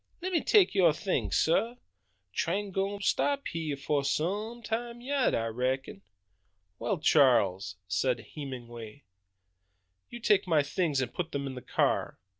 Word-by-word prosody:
Lemme 360 Hz, -2 st, -1 dB
take 410 Hz, -4 st, +5 dB
yo' 180 Hz, -5 st, +5 dB
things, 145 Hz, -, -1 dB
sah! 225 Hz, +9 st, +2 dB, 0.6 s
Train 195 Hz, -, -1 dB
gwine 195 Hz, +2 st, -1 dB
to -, -, -3 dB
stop 280 Hz, -1 st, +1 dB
hy'eh 160 Hz, -3 st, -3 dB
fo' 140 Hz, +1 st, 0 dB
some 205 Hz, -, -2 dB
time 235 Hz, +2 st, -3 dB
yet, 270 Hz, +2 st, +1 dB
I 115 Hz, -, 0 dB
reckon." 125 Hz, -1 st, -2 dB, 0.8 s
"Well, 200 Hz, -, -1 dB
Charles," 105 Hz, -, +3 dB
said 120 Hz, +6 st, 0 dB
Hemenway, 120 Hz, -4 st, -8 dB, 1.1 s
"you 240 Hz, -, -8 dB
take 210 Hz, -4 st, +3 dB
my 155 Hz, -4 st, +3 dB
things 145 Hz, -2 st, 0 dB
and 125 Hz, -2 st, -3 dB
put 170 Hz, -2 st, -4 dB
them 140 Hz, 0 st, -2 dB
in 135 Hz, -, -4 dB
the 125 Hz, -, -7 dB
car. -, -, 0 dB
160 Hz, 145 wpm, -29 LUFS, 130-210 Hz, 1.1 s, take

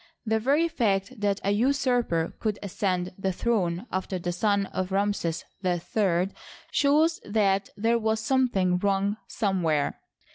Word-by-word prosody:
The 220 Hz, 0 st, +1 dB
very 285 Hz, +8 st, +2 dB
fact 215 Hz, -, -1 dB
that 200 Hz, -1 st, +1 dB
a 200 Hz, -, +1 dB
usurper 245 Hz, -7 st, +1 dB
could 215 Hz, -2 st, -1 dB
ascend 185 Hz, -2 st, -1 dB
the 190 Hz, 0 st, 0 dB
throne 185 Hz, -2 st, 0 dB
after 185 Hz, 0 st, -2 dB
the 175 Hz, 0 st, -3 dB
son 200 Hz, +2 st, +1 dB
of 185 Hz, 0 st, -4 dB
Ramses 195 Hz, -4 st, 0 dB, 0.2 s
III 180 Hz, +1 st, +1 dB, 0.4 s
shows 305 Hz, +3 st, +3 dB
that 200 Hz, -2 st, +1 dB
there 230 Hz, +3 st, +2 dB
was 220 Hz, 0 st, 0 dB
something 220 Hz, -7 st, +2 dB
wrong 200 Hz, +1 st, +1 dB
somewhere. 175 Hz, -9 st, 0 dB
200 Hz, 135 wpm, -27 LUFS, 185-225 Hz, 0.4 s, shows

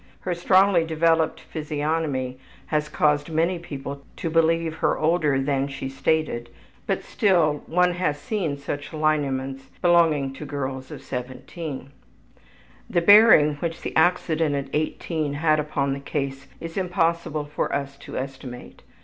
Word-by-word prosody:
Her 180 Hz, -, -2 dB
strongly 185 Hz, 0 st, +4 dB
developed 165 Hz, 0 st, +1 dB
physiognomy 150 Hz, -4 st, -2 dB, 0.3 s
has 150 Hz, 0 st, +1 dB
caused 150 Hz, 0 st, +1 dB
many 165 Hz, +3 st, +1 dB
people 140 Hz, -4 st, -7 dB
to 165 Hz, -, -3 dB
believe 165 Hz, 0 st, +2 dB
her -, -, +1 dB
older 155 Hz, -4 st, +2 dB
than 135 Hz, 0 st, 0 dB
she 135 Hz, -1 st, -5 dB
stated, 135 Hz, -3 st, -1 dB, 0.4 s
but -, -, -1 dB
still 165 Hz, -8 st, +2 dB
one 180 Hz, +1 st, +3 dB
has 175 Hz, -5 st, -1 dB
seen 165 Hz, -5 st, -2 dB
such 145 Hz, +2 st, -6 dB
lineaments 135 Hz, -3 st, -1 dB
belonging 165 Hz, -6 st, +3 dB
to 135 Hz, -, -8 dB
girls 130 Hz, -2 st, -4 dB
of -, -, -9 dB
17. 130 Hz, +3 st, -6 dB, 1.0 s
The 175 Hz, -, +2 dB
bearing 185 Hz, -7 st, +7 dB
which 165 Hz, +2 st, -4 dB
the -, -, -5 dB
accident 160 Hz, -3 st, +2 dB
at 140 Hz, -1 st, -4 dB
18 155 Hz, -1 st, -2 dB
had 155 Hz, 0 st, +2 dB
upon 145 Hz, -2 st, -1 dB
the 140 Hz, -, -4 dB
case 140 Hz, -1 st, -4 dB
it -, -, -7 dB
is -, -, -10 dB
impossible 170 Hz, -4 st, 0 dB
for 150 Hz, +1 st, -3 dB
us 140 Hz, -1 st, -3 dB
to -, -, -8 dB
estimate. 130 Hz, -2 st, -7 dB
150 Hz, 140 wpm, -24 LUFS, 140-165 Hz, 1.0 s, bearing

